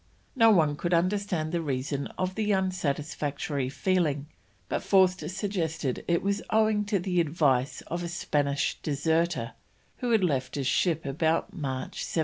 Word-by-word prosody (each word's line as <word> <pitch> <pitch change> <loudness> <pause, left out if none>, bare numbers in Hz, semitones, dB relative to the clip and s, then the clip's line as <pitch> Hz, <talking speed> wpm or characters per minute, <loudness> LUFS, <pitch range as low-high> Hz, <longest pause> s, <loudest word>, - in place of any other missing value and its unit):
No 225 -3 +6
one 155 -8 +4
could 175 +2 +1
understand 180 -2 0
the 170 -1 0
reason 140 -1 -2
of 185 0 -1
the 210 0 0
unsatisfactory 150 -6 -1
feeling, 155 -3 0 0.4
but - - -1
Forster 185 -2 +3
suggests 185 -5 -2
that 130 -3 -2
it 170 -1 +1
was 200 +1 0
owing 215 -1 +3
to 205 0 +1
the 180 -1 +1
advice 145 -5 +1
of 175 +2 -4
a 175 - -3
Spanish 145 -4 -1
deserter, 160 -3 0 0.4
who 245 - -2
had 225 -4 +3
left 135 -7 0
his 140 -2 -2
ship 160 +3 +1
about 160 +4 0
March 135 -7 -4
1773. - - -5
165 Hz, 155 wpm, -28 LUFS, 145-190 Hz, 0.4 s, No